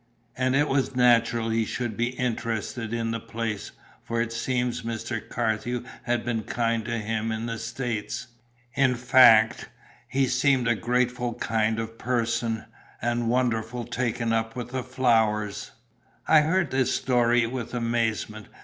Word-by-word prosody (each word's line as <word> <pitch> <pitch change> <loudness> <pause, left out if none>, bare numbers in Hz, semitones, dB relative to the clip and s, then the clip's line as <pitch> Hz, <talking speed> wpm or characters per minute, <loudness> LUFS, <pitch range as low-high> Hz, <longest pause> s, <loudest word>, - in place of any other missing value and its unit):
And 130 +1 +1
it 145 +2 +3
was 135 -2 0
natural 115 -2 +3
he 115 0 +2
should 120 0 -3
be 120 +2 0
interested 115 -2 -2
in 115 -1 -1
the 115 - -2
place, 110 -2 -4 0.3
for 115 0 -2
it 115 0 -1
seems 125 0 -1
Mr. 115 0 -4
Carthew 120 +1 -1 0.2
had 120 -2 -1
been 120 -2 -1
kind 115 0 -1
to 115 0 -2
him 110 +1 -2
in 110 +1 -3
the 115 -1 -4
States. 120 0 -4 0.5
In 130 0 +3
fact, 120 -3 +5 0.4
he 135 0 +1
seemed 130 -1 +2
a 120 - +4
grateful 120 +2 0
kind 110 -2 0
of 115 0 -5
person, 115 -2 -1 0.3
and 120 0 0
wonderful 120 -1 0
taken 120 -1 -1
up 115 0 -1
with 120 -1 -5 0.2
flowers." 110 -5 +1 0.6
I 155 -1 +7
heard 175 +4 +1
this 130 -1 +1
story 120 -2 +3
with 120 0 -5
amazement. 115 -2 -1
115 Hz, 145 wpm, -26 LUFS, 115-125 Hz, 0.6 s, I